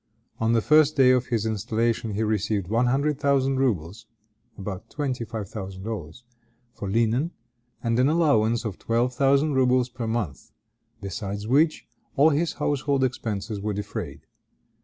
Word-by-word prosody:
On 115 +1 +2
the 115 -2 +2
first 155 0 +5
day 130 -2 +6
of 125 0 +2
his 115 -3 -1
installation 110 +1 -1
he 110 - 0
received 105 -3 -1
one 115 +3 +2
hundred 140 +3 +1
thousand 135 -2 +2
rubles 100 - -1 0.5
(about 95 0 -6
twenty 135 -5 -3
five 110 -2 -5
thousand 95 -3 -7
dollars) 105 -1 -6 0.5
for 100 - -6
linen, 115 - +1 0.5
and 115 0 +1
an 130 +3 +4
allowance 120 -8 +2
of 105 -5 -4
twelve 120 +2 0
thousand 140 +3 +3
rubles 125 -1 +3
per 120 -2 -5
month; 110 - -3 0.5
besides 100 +1 -5
which, 155 +6 +2 0.3
all 150 +2 +5
his 160 +3 0
household 140 -1 0
expenses 110 -5 -3
were 105 0 -2
defrayed. 105 0 -5
115 Hz, 150 wpm, -25 LUFS, 105-135 Hz, 0.5 s, day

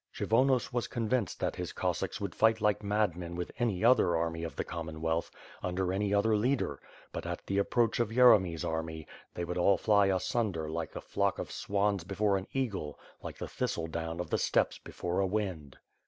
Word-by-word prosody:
Kshyvonos 130 +3 +2
was 120 -2 0
convinced 115 -3 -1
that - - -1
his - - -4
Cossacks - - -2
would 100 -3 -4
fight 110 0 +3
like 105 -1 +2
madmen 100 -5 -1
with 90 0 -4
any 110 -4 +1
other 115 -9 +5
army 80 0 -2
of 80 -3 -5
the - - -2
Commonwealth, 80 0 -3 0.3
under 90 0 -1
any 100 +1 0
other 105 +2 +3
leader; 115 - 0 0.3
but - - -5
at - - -5
the 100 +1 0
approach 115 +3 +1
of 120 -3 +1
Yeremy's 100 -9 +5
army, 80 -1 -3 0.3
they 85 - -2
would 90 +1 -3
all 100 +3 +4
fly 100 -2 +4
asunder 95 -3 0
like 80 0 -4
a - - -4
flock 100 -1 0
of - - -5
swans 100 -2 0
before 100 +2 +1
an 95 0 -3
eagle, 100 - -2 0.2
like - - -7
the - - -5
thistle 85 - -2
down 80 +1 -4
of 90 - -4
the - - +2
steppes - - +1
before 90 +2 -3
a 95 - +2
wind. 90 -9 -3
95 Hz, 190 wpm, -31 LUFS, 85-110 Hz, 0.3 s, other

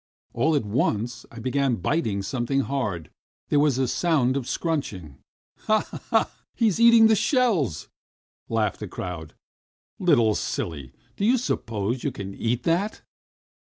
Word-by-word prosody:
All 155 +7 +2
at 140 - 0
once 110 +1 -1
I 120 - -12
began 130 +2 0
biting 105 - -1
something 130 +4 -1
hard, 105 - -3 0.4
there 145 - +3
was 145 -3 +3
a 130 -1 +1
sound 140 -5 +1
of 135 -3 -2
a - - -11
scrunching. 95 - -3 0.5
"Ha, 215 0 +2 0.2
ha! - - +2 0.2
He 230 - +1
is 200 - -2
eating 235 -1 +7
the 220 - +6
shells," 195 - +1 0.6
laughed 110 -2 0
the 105 - -5
crowd. 85 -4 -7 0.6
"Little 110 -2 +4
silly, 70 -10 -4 0.3
do - - -3
you 240 +5 +4
suppose 115 - -2
you - - 0
can 100 0 -7
eat 115 +4 -2
that?" 180 +6 0
125 Hz, 150 wpm, -25 LUFS, 105-165 Hz, 0.6 s, eating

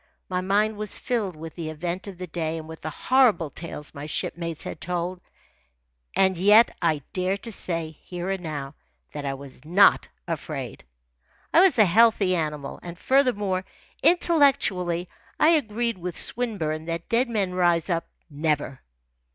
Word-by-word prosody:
My 180 -1 -1
mind 205 +3 +1
was 210 -1 -3
filled 215 -8 -2
with 160 0 -8
the 165 -3 -5
event 175 +5 -4
of 195 -3 -8
the 180 - -5
day 165 -1 -3
and 155 -1 -8
with 160 0 -10
the 155 - -4
horrible 210 - +2
tales 155 -3 -8
my 145 0 -7
shipmates 165 +1 -3
had - - -7
told, 180 +1 -3 0.9
and 190 -2 +3
yet 210 +5 +6
I 155 -5 +1
dare 185 +1 0
to 230 +3 -8
say, 165 -5 -4
here 180 +1 -4
and 195 -1 -3
now, 145 -4 -5 0.4
that 145 -1 -6
I 135 - -2
was 135 0 -12
not 180 +6 +5 0.2
afraid. 145 - -5 0.7
I - - +7
was 375 -5 +5
a 215 - +7
healthy 200 -1 +4
animal, 150 -4 -3
and 175 0 -8
furthermore, 210 -8 +1 0.4
intellectually, 270 - +3 0.3
I 310 - +6
agreed 235 - +1
with 180 -1 -4
Swinburne 165 -11 0
that 170 0 -4
dead 240 +2 +1
men 200 -5 -1
rise 175 -2 +2
up 170 -3 -1 0.2
never. 145 -3 -2
180 Hz, 160 wpm, -25 LUFS, 160-210 Hz, 0.9 s, I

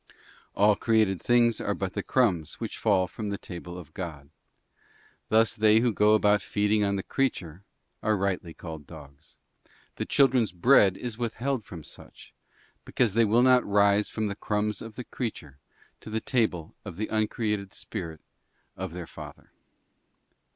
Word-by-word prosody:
All 105 +1 +4
created 110 -5 +1
things 120 -2 +3
are 100 - -1
but 95 -1 -4
the 100 - -2
crumbs 95 - +1
which 115 - -5
fall 100 -4 +3
from 105 +3 -6
the 100 - -3
table 90 -1 -8
of 80 -4 -11
God. 75 -6 -7 1.0
Thus 110 +1 +3
they 110 +1 +4
who 120 -2 +1
go 105 +1 +4
about 105 -1 +3
feeding 105 0 +1
on 100 0 +1
the 95 - -3
creature 95 - -2 0.4
are 110 -1 +1
rightly 95 -3 -2
called 80 -4 -9
dogs; 75 -2 -14 0.6
the - - -2
children's 130 -7 +3
bread 100 -1 +5
is 120 -2 -6
withheld 120 +1 -2
from 85 -6 -10
such, - - -13 0.5
because 120 -6 0
they 115 +1 +4
will 115 +4 +3
not 125 -1 +5
rise 100 0 +3
from 110 - -3
the 100 - -2
crumbs 105 0 -2
of 115 -1 -9
the 125 - -6
creature 80 - -6 0.4
to - - -11
the 110 +1 -1
table 110 - -1
of 100 -5 -8
the 110 - -2
uncreated 105 -2 -1
Spirit 85 -7 -7 0.5
of 95 -2 -6
their 90 -1 -6
Father. - - -12
105 Hz, 160 wpm, -27 LUFS, 90-110 Hz, 1.0 s, bread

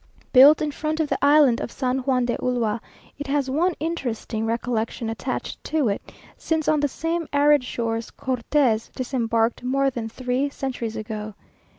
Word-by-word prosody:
Built 285 +4 +8
in 300 - -1
front 310 +2 -3
of 310 -2 0
the - - 0
island 285 -4 +5
of - - -4
San 255 -1 -1
Juan 255 -1 +1
de 240 - 0
Ulua, 235 -3 -1 0.4
it 290 - -5
has 275 -1 0
one 345 +6 +1
interesting 240 -8 -3
recollection 230 0 -2
attached 225 +4 -5
to 300 -7 +1
it, 200 - -2 0.3
since 320 -2 -2
on 310 - +3
the 290 - +2
same 330 +3 -3
arid 290 -1 +4
shores, 230 -2 -3
Cortes 250 -2 0
disembarked 230 -3 0
more 270 +2 +1
than 230 -3 -4
three 255 +4 -1
centuries 250 -5 -4
ago. 215 -1 -5
255 Hz, 165 wpm, -23 LUFS, 230-290 Hz, 0.4 s, Built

